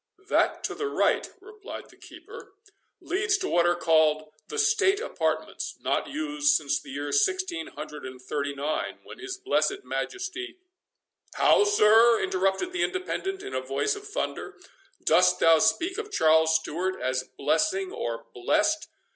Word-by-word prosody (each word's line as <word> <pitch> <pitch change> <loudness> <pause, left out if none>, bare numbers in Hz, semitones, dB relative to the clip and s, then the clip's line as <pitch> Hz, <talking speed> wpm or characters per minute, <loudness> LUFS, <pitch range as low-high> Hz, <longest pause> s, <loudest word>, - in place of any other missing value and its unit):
"That - - +1
to - - -2
the 425 - -3
right," - - +1
replied 425 0 -10
the - - -19
keeper, - - -13 0.5
"leads 395 +5 0
to 380 0 -3
what 175 0 +3
are 175 - +3
called, 155 -2 +2
the 445 - -6
state 415 -2 +3
apartments, 485 - -3
not - - -1
used 300 0 +1
since 140 -1 0
the - - -13
year 145 +1 -4
sixteen 345 - 0
hundred 150 -1 -9
and 130 0 -10
thirty 140 +2 -3
nine, 145 +3 -3
when - - -12
his 385 -2 -6
blessed 390 0 0
Majesty"— 380 -1 -5 0.8
"How, 415 - +5
sir!" 230 - +5
interrupted 190 - 0
the 365 -1 -2
Independent, 380 +1 -3
in - - -7
a 130 - -1
voice 135 - -1
of 410 0 -10
thunder, 415 - -4 0.5
"dost - - +4
thou 165 -1 +6
speak 365 - +1
of 425 -1 -6
Charles 160 - +4
Stewart 175 +4 -2
as 130 0 -1
blessing, 190 +5 0
or 115 -1 -4
blessed? 120 - +1
230 Hz, 155 wpm, -26 LUFS, -, 0.8 s, thou